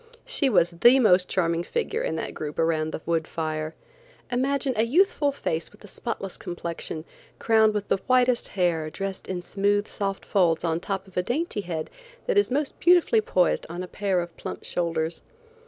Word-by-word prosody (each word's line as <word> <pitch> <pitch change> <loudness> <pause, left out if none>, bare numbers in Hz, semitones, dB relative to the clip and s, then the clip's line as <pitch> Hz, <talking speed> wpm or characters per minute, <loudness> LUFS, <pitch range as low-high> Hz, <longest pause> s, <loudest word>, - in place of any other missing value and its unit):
She 320 - +1
was 175 -7 +3
the 240 +10 +6
most 185 -6 +4
charming 170 -2 +1
figure 465 - -2
in - - -1
that - - -4
group 150 -1 -6
around 160 -1 +1
the - - -5
wood 165 -1 0
fire. 155 -1 -3 0.6
Imagine 265 +2 +1
a 215 - +2
youthful 290 - +3
face 165 -11 -3
with 205 - -19
a - - -11
spotless 195 -3 -5
complexion, 170 -2 -5 0.3
crowned 220 -1 +3
with 205 -1 -2
the - - +2
whitest 250 -1 +3
hair, 170 -4 0
dressed 195 +3 -5
in 180 -2 -4
smooth, 205 +2 +1
soft 195 -1 -3
folds 175 -5 +2
on 165 -1 +1
the - - -7
top 195 -1 -2
of 190 - -14
a - - +4
dainty 245 - -2
head 165 -4 -5 0.3
that - - 0
is 410 - +2
most 275 +2 -1
beautifully 360 +6 +5
poised 180 - +1
on 175 +2 -5
a - - -6
pair 195 -2 0
of 175 -1 -8
plump - - -6
shoulders. 165 -1 -2
195 Hz, 190 wpm, -25 LUFS, 170-245 Hz, 0.6 s, the